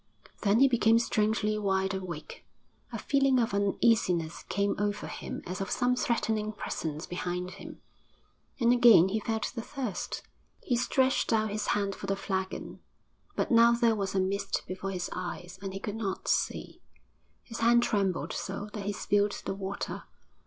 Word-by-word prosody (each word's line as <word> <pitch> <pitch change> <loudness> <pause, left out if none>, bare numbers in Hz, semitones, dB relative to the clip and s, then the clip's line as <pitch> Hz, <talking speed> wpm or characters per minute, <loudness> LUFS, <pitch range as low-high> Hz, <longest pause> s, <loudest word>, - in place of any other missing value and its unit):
Then 210 +3 +3
he 275 - +8
became 230 -3 +4
strangely 215 -2 +1
wide 190 -1 0
awake, 180 -5 -6 0.5
a - - -4
feeling 275 -2 +2
of 230 -4 +1
uneasiness 200 -5 +1
came 200 0 +1
over 205 0 -1
him - - -6
as 185 +3 -5
of 195 - -3
some 250 0 +2
threatening 220 -3 0
presence 155 -6 -4
behind 180 0 -3
him, - - -10 0.8
and 240 -1 +4
again 235 -7 +7
he 215 +3 0
felt 220 +1 -2
the 235 - -4
thirst. 245 -6 -4 0.4
He 250 - +1
stretched 260 +3 +2
out 215 -2 +2
his 210 0 -2
hand 200 -1 -1
for 195 - -7
the 195 - +1
flagon, 190 -1 -4 0.6
but - - -1
now 235 0 +7
there 235 -1 +3
was 195 -3 -2
a - - +3
mist 195 +1 -1
before 185 +1 -5
his 180 -2 -3
eyes 175 0 -6
and 195 -1 -4
he 195 - -5
could 210 +1 -4
not 195 -4 -3
see, - - -1 0.6
his 230 - -8
hand 235 +1 +5
trembled 195 -6 0
so 200 +2 -5
that 200 -2 -5
he 205 - 0
spilled 205 0 +1
the - - -1
water. 195 0 -5
205 Hz, 165 wpm, -29 LUFS, 190-230 Hz, 0.8 s, he